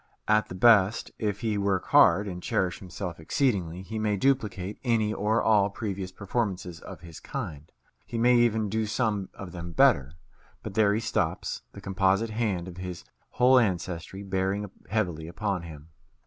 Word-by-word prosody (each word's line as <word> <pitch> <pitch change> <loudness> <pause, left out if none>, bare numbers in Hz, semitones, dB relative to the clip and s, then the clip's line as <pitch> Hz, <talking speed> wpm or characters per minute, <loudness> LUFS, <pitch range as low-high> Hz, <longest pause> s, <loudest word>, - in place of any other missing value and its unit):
At 110 0 +3
the 90 - -6
best, 105 0 +4
if 105 -2 -2
he 110 -3 0
work 100 -2 0
hard, 105 +1 +6
and 90 -2 -5
cherish 90 -1 -1
himself 90 -2 -6
exceedingly, 90 - 0
he 110 +3 -5
may 105 -1 0
duplicate 105 -6 0
any 110 -4 +1
or 110 +2 +1
all 105 -2 +4
previous 100 -3 -5
performances 95 -4 -3
of - - -10
his 85 -2 -11
kind; 75 0 -6 0.4
he 120 - -4
may 120 +2 +4
even 110 -2 +2
do 110 +2 -1
some 105 -4 -1
of 95 -2 -8
them 85 -1 -7
better; 70 -2 +4 0.5
but - - -6
there 105 -1 +3
he - - 0
stops, 115 -1 -2
the - - -10
composite 95 +3 +1
hand 105 -6 -1
of 90 -1 -9
his 90 -2 -6 0.3
whole 130 +1 +5
ancestry 95 -2 -2
bearing 95 +1 -2 0.2
heavily 90 -8 -1
upon 95 +1 -2
him. 80 -2 -11
100 Hz, 165 wpm, -27 LUFS, 90-110 Hz, 0.5 s, hard